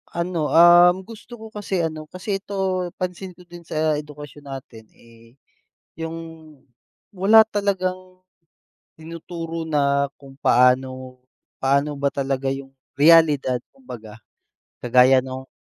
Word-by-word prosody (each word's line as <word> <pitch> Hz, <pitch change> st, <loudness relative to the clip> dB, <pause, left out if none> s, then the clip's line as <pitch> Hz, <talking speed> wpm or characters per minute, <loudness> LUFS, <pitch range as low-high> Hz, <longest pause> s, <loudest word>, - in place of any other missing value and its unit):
Ano, 170 Hz, -3 st, -2 dB
um, 175 Hz, +2 st, +6 dB
gusto 230 Hz, +3 st, -12 dB
ko 220 Hz, -1 st, -12 dB
kasi 195 Hz, -4 st, -3 dB
ano 155 Hz, -1 st, -5 dB
kasi 195 Hz, +3 st, -4 dB
ito 190 Hz, -2 st, -2 dB
pansin 180 Hz, 0 st, -6 dB
ko 180 Hz, -, -17 dB
din 175 Hz, -1 st, -14 dB
sa 155 Hz, -1 st, 0 dB
edukasyon 145 Hz, -1 st, -12 dB
natin 120 Hz, -5 st, -10 dB
eh 115 Hz, +1 st, -20 dB, 0.6 s
'yung 165 Hz, +1 st, -6 dB, 1.0 s
wala 215 Hz, +4 st, +6 dB
talagang 200 Hz, -3 st, -1 dB, 1.0 s
tinuturo 165 Hz, 0 st, -7 dB
na 140 Hz, -2 st, 0 dB
kung 135 Hz, -1 st, -15 dB
paano 130 Hz, 0 st, +1 dB, 0.4 s
paano 140 Hz, +2 st, 0 dB
ba 140 Hz, 0 st, -1 dB
talaga 135 Hz, -1 st, -2 dB
yung 135 Hz, 0 st, -8 dB, 0.3 s
realidad 150 Hz, -5 st, +5 dB, 0.2 s
kumbaga, 110 Hz, -, -12 dB, 0.6 s
kagaya 130 Hz, +2 st, +4 dB
nung 130 Hz, 0 st, -8 dB
155 Hz, 115 wpm, -22 LUFS, 135-180 Hz, 1.0 s, um